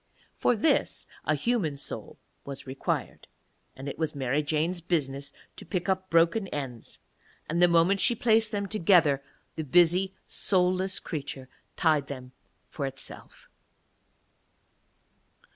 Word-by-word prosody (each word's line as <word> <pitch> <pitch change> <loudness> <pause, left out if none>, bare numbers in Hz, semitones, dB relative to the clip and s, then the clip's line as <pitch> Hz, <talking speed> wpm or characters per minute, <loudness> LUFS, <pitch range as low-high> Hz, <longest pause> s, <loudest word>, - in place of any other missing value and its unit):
For 245 - +2
this 230 +9 +1 0.2
a 155 - +2
human 165 - 0
soul - - -5 0.3
was 140 -1 -7
required, 135 0 -3 0.5
and 135 +2 -8
it 140 - -6
was 160 -2 -1
Mary 135 +1 0
Jane's 160 +4 -1
business 140 -5 -1 0.3
to - - -5
pick 180 +1 -3
up 190 0 -1
broken 170 +5 +3
ends; 135 -8 -6 0.5
and 170 +3 0
the 175 - +8
moment 170 +3 +4
she 240 - +4
placed 225 -1 +3
them 200 -2 -1
together 170 -8 +4 0.4
the 160 - -2
busy 175 +6 +3
soulless 185 0 +1
creature 140 -4 -6 0.3
tied 155 -4 +2
them 130 -2 -8 0.4
for 140 -3 -4
itself. 135 0 -9
165 Hz, 125 wpm, -28 LUFS, 140-190 Hz, 0.5 s, the